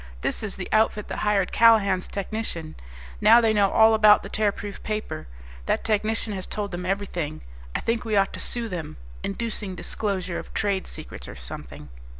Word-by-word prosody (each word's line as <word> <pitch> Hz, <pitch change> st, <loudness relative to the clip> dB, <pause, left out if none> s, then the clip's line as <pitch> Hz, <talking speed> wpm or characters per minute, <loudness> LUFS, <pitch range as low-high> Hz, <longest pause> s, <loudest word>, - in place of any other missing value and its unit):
"This -, -, -1 dB
is 215 Hz, -3 st, -3 dB
the 185 Hz, -, -5 dB
outfit 215 Hz, -1 st, +2 dB
that -, -, -4 dB
hired 205 Hz, -3 st, +1 dB
Callahan's 205 Hz, -5 st, +5 dB
technician. 195 Hz, -6 st, -4 dB, 0.5 s
Now 235 Hz, -, +8 dB
they 225 Hz, -2 st, +3 dB
know 200 Hz, -2 st, +4 dB
all 220 Hz, +2 st, +6 dB
about 215 Hz, -1 st, +6 dB
the -, -, -7 dB
Tearproof 205 Hz, -1 st, -2 dB
Paper. 210 Hz, -, -4 dB, 0.4 s
That -, -, +1 dB
technician 215 Hz, 0 st, 0 dB
has 190 Hz, -2 st, -4 dB
told 205 Hz, -1 st, -4 dB
them 180 Hz, 0 st, -4 dB
everything. 180 Hz, -6 st, -2 dB, 0.3 s
I -, -, 0 dB
think 230 Hz, 0 st, 0 dB
we 220 Hz, -2 st, -1 dB
ought 195 Hz, -1 st, +3 dB
to -, -, -6 dB
sue 235 Hz, -1 st, -3 dB
them 170 Hz, -, -6 dB, 0.3 s
inducing 205 Hz, -2 st, -3 dB
disclosure 185 Hz, 0 st, -2 dB
of -, -, -10 dB
trade 200 Hz, -3 st, 0 dB
secrets, -, -, -6 dB
or -, -, -8 dB
something." 70 Hz, +3 st, -8 dB
200 Hz, 175 wpm, -25 LUFS, 185-215 Hz, 0.5 s, Now